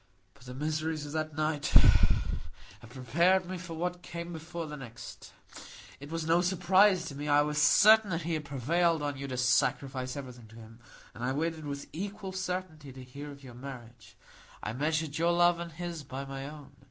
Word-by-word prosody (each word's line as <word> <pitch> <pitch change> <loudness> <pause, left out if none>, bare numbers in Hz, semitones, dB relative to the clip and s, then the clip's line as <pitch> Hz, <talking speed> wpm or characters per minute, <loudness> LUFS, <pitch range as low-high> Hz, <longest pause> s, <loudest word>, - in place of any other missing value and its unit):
"But 140 -2 -19
the 125 0 -8
miseries 155 +1 -2
of 145 - -7
that 155 -1 -3
night 155 -1 0 1.1
had 120 - -14
prepared 170 +10 +2
me 185 0 -5
for 170 -2 -7
what 180 +2 -3
came 170 0 -6
before 165 +1 -6
the 150 -1 -7
next. 120 -5 -10 0.7
It 145 +1 -10
was 165 0 -3
no 165 +2 +4
surprise 185 +1 +4
to - - -6
me. 145 +1 -5
I 145 0 +5
was 150 0 0
certain 215 +7 +7
that 165 -2 -2
he 170 +1 -2
had 155 -1 -2
prevailed 155 +4 +1
on 145 -1 -2
you 140 +1 -5
to 130 -2 -4
sacrifice 130 +1 +1
everything 125 -4 -8
to 110 - -16
him, 115 0 -13 0.3
and 120 - -8
I 130 +2 0
waited 160 +1 -2
with 140 0 -5
equal 195 +2 -5
certainty 180 -6 -4
to 130 0 -10
hear 140 +4 -9
of 140 -1 -12
your 125 -2 -10
marriage. 120 -4 -10 0.5
I 105 - -3
measured 155 +3 -1
your 170 +1 +3
love 175 0 +4
and 170 0 -5
his 170 0 -5
by 135 0 -6
my 135 +1 -6
own. 145 -2 -11
150 Hz, 195 wpm, -30 LUFS, 135-170 Hz, 1.1 s, certain